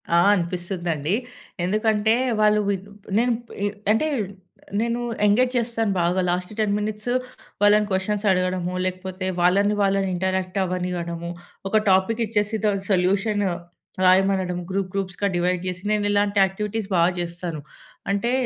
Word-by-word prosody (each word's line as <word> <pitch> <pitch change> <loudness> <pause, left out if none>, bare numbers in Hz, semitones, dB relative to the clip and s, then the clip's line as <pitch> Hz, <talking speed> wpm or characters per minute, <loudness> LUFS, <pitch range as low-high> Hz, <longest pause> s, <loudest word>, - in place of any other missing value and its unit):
ఆ! - - +6 0.2
అనిపిస్తుందండి. 175 -3 -2 0.5
ఎందుకంటే 215 +3 +2 0.3
వాళ్ళు 210 0 +4
విన్ 195 -1 -2 0.3
నేను 240 +1 +3 0.6
అంటే 225 +9 +2 0.7
నేను 235 +1 0 0.3
ఎంగేజ్ 245 +5 +3
చేస్తాను 225 -3 0
బాగా 175 +2 +1
లాస్ట్ 180 +2 -1
10 210 -2 +2
మినిట్స్ 215 +3 -3 0.5
వాళ్ళని 210 0 +5
క్వెషన్స్ 200 +3 -1
అడగడము, 185 -1 0
లేకపోతే 185 0 -4
వాళ్ళని 200 +4 +3
వాళ్ళని 195 0 +2
ఇంటరాక్ట్ 190 +1 -1
అవ్వనివ్వడము, 175 -2 -3 0.4
ఒక 215 +1 +3
టాపిక్ 190 +5 +3
ఇచ్చేసి 210 0 0
దాని 200 -2 +1
సొల్యూషన్ 200 +3 +2 0.6
రాయమనడం 185 -1 +3
గ్రూప్ 190 -1 -2
గ్రూప్స్‌గా 195 0 -1
డివైడ్ 180 0 +1
జేసి, 180 0 -4
నేను 210 -1 +1
ఇలాంటి 205 0 +2
యాక్టివిటీస్ 210 +2 -4
బా 170 - +4 0.2
జేస్తాను. 170 -2 -4 0.5
అంటే 200 +4 0
195 Hz, 125 wpm, -23 LUFS, 180-210 Hz, 0.7 s, ఆ